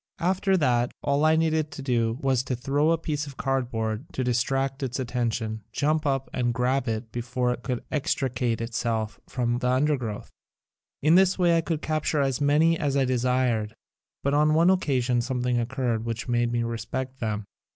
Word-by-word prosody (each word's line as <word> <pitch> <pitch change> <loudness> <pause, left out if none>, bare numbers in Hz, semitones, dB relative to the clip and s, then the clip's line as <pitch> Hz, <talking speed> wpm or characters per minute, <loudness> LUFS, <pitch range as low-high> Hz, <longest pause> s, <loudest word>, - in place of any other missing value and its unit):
After 190 +2 +1
that 125 -6 +1
all 140 +1 +1
I 155 0 +5
needed 160 -1 +1
to 140 - -7
do 115 -3 +1
was 130 -3 +2
to 130 - -1
throw 140 +5 +1
a 165 - +3
piece 150 -2 -3
of 135 - -10
cardboard 120 -2 -2
to 130 - -1
detract 135 +3 0
its 130 -1 -3
attention, 115 -3 -2
jump 155 +5 0
up 135 -1 0
and 120 -2 0
grab 130 +2 +1
it 110 0 -3
before 125 +1 -1
it 125 - -8
could 125 -1 -3
extricate 125 -6 -1
itself 115 -1 -2
from 120 -1 -1
the 125 - 0
undergrowth. 130 -5 0 0.7
In 155 +2 +5
this 190 +1 +5
way 175 -2 +4
I 165 - +3
would 160 -2 -1
capture 155 -1 0
as 135 -1 0
many 155 +3 +3
as 140 -3 0
I 135 - +3
desired. 125 -3 0 0.5
But 140 - +1
on 150 +1 +4
one 170 +3 +5
occasion 125 -9 +1
something 125 -1 0
occurred 120 -2 -1
which 115 -1 -4
made 120 -1 +1
me 120 -1 0
respect 120 +3 -4
them. 110 -2 -2
130 Hz, 180 wpm, -26 LUFS, 120-145 Hz, 0.7 s, I